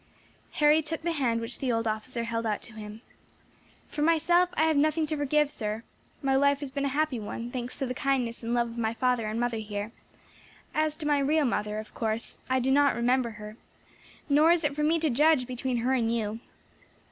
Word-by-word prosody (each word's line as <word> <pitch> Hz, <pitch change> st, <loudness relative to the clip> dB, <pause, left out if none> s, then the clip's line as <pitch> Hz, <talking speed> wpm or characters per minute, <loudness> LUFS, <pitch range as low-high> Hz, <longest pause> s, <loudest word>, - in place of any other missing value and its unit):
Harry 300 Hz, +1 st, +4 dB
took 320 Hz, +1 st, -5 dB
the 340 Hz, -, 0 dB
hand 255 Hz, -7 st, 0 dB
which 230 Hz, +2 st, -4 dB
the 260 Hz, -2 st, 0 dB
old 230 Hz, 0 st, 0 dB
officer 220 Hz, +3 st, -2 dB
held 230 Hz, 0 st, -2 dB
out 215 Hz, -2 st, -2 dB
to 225 Hz, -, -8 dB
him. 215 Hz, +1 st, -9 dB, 0.8 s
"For 295 Hz, -, -5 dB
myself, 335 Hz, +3 st, +3 dB
I 315 Hz, -, +2 dB
have 320 Hz, -1 st, +3 dB
nothing 310 Hz, +2 st, +2 dB
to 310 Hz, 0 st, -2 dB
forgive, 295 Hz, 0 st, +1 dB
sir. 215 Hz, -2 st, -3 dB, 0.4 s
My 270 Hz, -1 st, +2 dB
life 280 Hz, +1 st, +3 dB
has 280 Hz, -2 st, -5 dB
been 280 Hz, +1 st, -2 dB
a -, -, +1 dB
happy 285 Hz, -2 st, 0 dB
one, 230 Hz, +3 st, -6 dB
thanks 245 Hz, -1 st, -4 dB
to 275 Hz, -, -1 dB
the 250 Hz, -, -3 dB
kindness 255 Hz, -3 st, -1 dB
and 230 Hz, 0 st, -4 dB
love 235 Hz, -1 st, +1 dB
of 230 Hz, -, -10 dB
my 225 Hz, 0 st, -1 dB
father 250 Hz, -3 st, +1 dB
and 215 Hz, +2 st, -2 dB
mother 240 Hz, -2 st, -1 dB
here; 210 Hz, 0 st, -5 dB, 0.8 s
as 310 Hz, 0 st, +1 dB
to 310 Hz, -, -7 dB
my 295 Hz, -1 st, +3 dB
real 295 Hz, +2 st, +2 dB
mother, 210 Hz, -3 st, -1 dB
of 215 Hz, 0 st, -7 dB
course, 220 Hz, 0 st, -3 dB
I 260 Hz, 0 st, +2 dB
do 260 Hz, +1 st, +1 dB
not 285 Hz, +1 st, +4 dB
remember 245 Hz, +1 st, +1 dB
her, 210 Hz, +1 st, -9 dB, 0.7 s
nor 305 Hz, +3 st, +5 dB
is 340 Hz, -1 st, +2 dB
it 290 Hz, -1 st, 0 dB
for 300 Hz, -, -2 dB
me 315 Hz, +2 st, +3 dB
to 315 Hz, -3 st, +1 dB
judge 295 Hz, +1 st, +4 dB
between 250 Hz, 0 st, -2 dB
her 260 Hz, -, +2 dB
and 230 Hz, -3 st, +1 dB
you. 220 Hz, -1 st, -2 dB
255 Hz, 215 wpm, -28 LUFS, 230-295 Hz, 0.8 s, nor